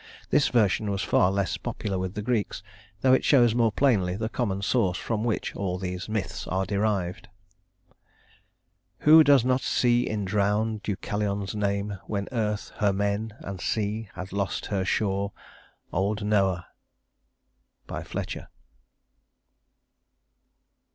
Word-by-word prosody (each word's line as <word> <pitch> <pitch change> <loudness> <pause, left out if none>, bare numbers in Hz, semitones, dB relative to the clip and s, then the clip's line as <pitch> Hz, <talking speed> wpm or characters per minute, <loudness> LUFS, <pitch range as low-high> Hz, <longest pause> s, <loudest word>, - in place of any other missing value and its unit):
This 145 +1 +4
version 110 -3 +2
was 100 -1 -1
far 90 - +3
less 100 -1 -1
popular 95 -3 -3
with 95 0 -4
the 105 - -3
Greeks, 105 -3 -1 0.4
though 130 -1 +5
it 130 - +4
shows 120 -5 +5
more 115 -2 +3
plainly 100 -8 +2
the 110 +2 -2
common 100 -6 -2
source 95 -2 +1
from 110 -2 -2
which 115 -3 -2
all 95 -2 -2
these 90 +1 -5
myths 90 -5 -3
are 95 +1 0
derived. 100 -3 -1 1.7
"Who 160 +1 +8
does 140 -4 +5
not 130 0 +2
see 120 0 +2
in 105 -2 -2
drowned 105 +2 0
Deucalion's 100 0 -2
name, 100 -1 -1
When 100 -1 -2
Earth 105 -4 -2
her 105 -2 +3
men, 100 +2 -1
and 95 -2 -6
Sea 110 0 -2
had 90 +1 -7
lost 100 -1 -2
her 100 -2 -1
shore, 100 0 0 0.6
Old 100 +3 0
Noah!" 95 -4 +2 1.2
FLETCHER. - - -5
105 Hz, 130 wpm, -26 LUFS, 95-110 Hz, 1.7 s, Who